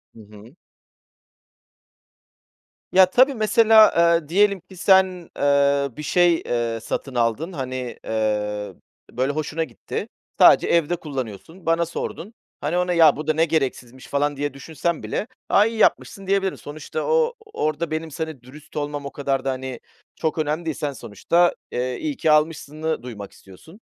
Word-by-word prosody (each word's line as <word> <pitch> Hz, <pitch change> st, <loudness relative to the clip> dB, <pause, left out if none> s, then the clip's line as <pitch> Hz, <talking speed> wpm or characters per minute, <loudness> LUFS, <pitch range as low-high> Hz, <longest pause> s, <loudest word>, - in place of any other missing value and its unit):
Hı -, -, -14 dB
hı. 105 Hz, +6 st, -15 dB, 2.4 s
Ya 190 Hz, 0 st, +7 dB
tabii, 255 Hz, +8 st, +4 dB
mesela, 220 Hz, -1 st, +5 dB, 0.3 s
eee, 150 Hz, -, -18 dB
diyelim 200 Hz, +2 st, +3 dB
ki 180 Hz, +2 st, -16 dB
sen, 185 Hz, -2 st, +3 dB
eee, 140 Hz, 0 st, +2 dB
bir 150 Hz, -, -6 dB
şey, 175 Hz, +2 st, +3 dB
eee, 115 Hz, -1 st, -1 dB
satın 130 Hz, +3 st, -5 dB
aldın. 120 Hz, +9 st, 0 dB
Hani, 130 Hz, -4 st, -5 dB
eee, 105 Hz, -2 st, -2 dB, 0.4 s
böyle 130 Hz, +3 st, -1 dB
hoşuna 155 Hz, +2 st, -2 dB
gitti. 125 Hz, -7 st, -6 dB, 0.3 s
Sadece -, -, +7 dB
evde 170 Hz, 0 st, +2 dB
kullanıyorsun, 140 Hz, -, -7 dB
bana 165 Hz, +1 st, +2 dB
sordun. 170 Hz, +4 st, -6 dB, 0.3 s
Hani, 150 Hz, +5 st, -1 dB
ona, 180 Hz, 0 st, +1 dB
"Ya, 160 Hz, -4 st, +6 dB
bu 155 Hz, -, -7 dB
da 155 Hz, -, +3 dB
ne 160 Hz, +2 st, +2 dB
gereksizmiş" 130 Hz, -5 st, -3 dB
falan 145 Hz, +1 st, 0 dB
diye 145 Hz, -1 st, -2 dB
düşünsem 160 Hz, +4 st, -3 dB
bile, 210 Hz, -, -3 dB, 0.2 s
"A, 205 Hz, -, +5 dB
iyi 225 Hz, 0 st, -3 dB
yapmışsın" 195 Hz, -2 st, +1 dB
diyebilirim. 195 Hz, -1 st, 0 dB
Sonuçta 155 Hz, -, -6 dB
o 475 Hz, 0 st, +2 dB, 0.2 s
orada 155 Hz, +1 st, -2 dB
benim 160 Hz, 0 st, -3 dB
seni 160 Hz, -4 st, -5 dB
dürüst 135 Hz, +4 st, -15 dB
olmam 145 Hz, -1 st, -3 dB
o 140 Hz, -, -5 dB
kadar 135 Hz, -2 st, -2 dB
da, 135 Hz, -, +1 dB
hani, 130 Hz, -1 st, -6 dB, 0.4 s
çok 160 Hz, -1 st, -2 dB
önemli 155 Hz, +2 st, -1 dB
değil 160 Hz, -3 st, -2 dB
sen 145 Hz, -2 st, -3 dB
sonuçta, 130 Hz, -, +1 dB, 0.2 s
eee, 125 Hz, +1 st, -2 dB
iyi 300 Hz, -4 st, -3 dB
ki 155 Hz, -, +2 dB
almışsını 155 Hz, 0 st, 0 dB
duymak 105 Hz, -5 st, -8 dB
istiyorsun. 160 Hz, -, -16 dB
150 Hz, 155 wpm, -22 LUFS, 130-175 Hz, 2.4 s, Ya